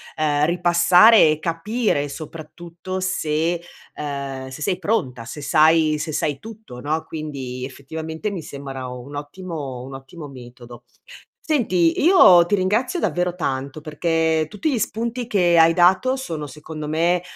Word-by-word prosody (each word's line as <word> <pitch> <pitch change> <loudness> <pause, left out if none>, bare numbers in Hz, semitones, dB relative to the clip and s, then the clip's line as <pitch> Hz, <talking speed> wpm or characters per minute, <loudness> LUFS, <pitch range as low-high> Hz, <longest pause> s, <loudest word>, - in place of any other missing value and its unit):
ehm, 150 -1 +1
ripassare 175 +3 +5
e 155 - -2
capire 165 -1 -1
soprattutto 165 +4 -8
se 165 -2 -1 0.4
ehm, 140 -2 -5
se 130 +3 -10
sei 185 +3 0
pronta, 155 - -2
se 145 +6 -8
sai 155 +1 +3
se 155 +1 -4
sai 145 -1 -1
tutto, 215 - -11
no, 155 +2 -2
quindi, 135 -6 -6
effettivamente 160 +7 -6
mi 180 -6 -6
sembra 135 -2 -7
un 125 +3 -9
ottimo 145 -4 -6
un 135 +1 -9
ottimo 145 +4 -10
metodo. 120 -2 -12 0.6
Senti, 185 - +2
io 280 - +7
ti 205 - +2
ringrazio 220 - 0
davvero 180 - -1
tanto, 140 -2 -3
perché 160 0 0
tutti 245 - -2
gli 240 - 0
spunti 235 +2 -3
che 175 -6 +3
hai 165 +1 +6
dato 185 +9 +4
sono, 160 - -5
secondo 150 +2 -8
me, 170 +3 +1
160 Hz, 140 wpm, -21 LUFS, 145-185 Hz, 0.6 s, io